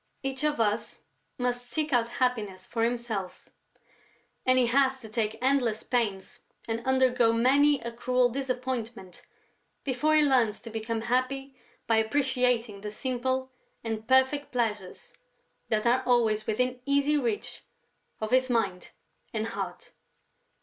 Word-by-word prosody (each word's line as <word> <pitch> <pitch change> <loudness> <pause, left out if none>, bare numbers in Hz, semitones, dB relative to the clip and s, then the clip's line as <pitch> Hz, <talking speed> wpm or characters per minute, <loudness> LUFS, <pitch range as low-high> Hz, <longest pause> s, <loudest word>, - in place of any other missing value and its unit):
Each 270 +1 -3
of 300 -3 +1
us 215 0 -1 0.4
must 245 0 -2
seek 310 -2 -1
out 235 -1 +2
happiness 215 -7 -1
for 230 -1 -2
himself; 230 -5 -3 1.0
and 255 0 +5
he 255 - +5
has 265 +2 +2
to 220 - -9
take 220 -1 -1
endless 255 -5 +2
pains 210 -7 -2 0.3
and 230 0 -3
undergo 255 -3 +3
many 275 +5 +4
a 235 - -5
cruel 250 +1 +2
disappointment 245 -6 -4 0.6
before 280 +4 +1
he 305 - +5
learns 245 -7 +2
to 230 - -9
become 225 0 -3
happy 260 +3 -1 0.3
by 225 - +2
appreciating 245 -3 +1
the 210 - -5
simple 260 +3 -2 0.3
and 220 -1 -4
perfect 265 +3 +3
pleasures 210 -6 -3 0.6
that 215 0 0
are 245 +2 +3
always 220 -3 +2
within 250 +3 0
easy 280 +1 +3
reach 235 -7 -2 0.6
of 215 0 -3
his 255 0 +3
mind 200 -7 -1 0.5
and 220 +1 -1
heart. - - -6
245 Hz, 135 wpm, -28 LUFS, 225-260 Hz, 1.0 s, and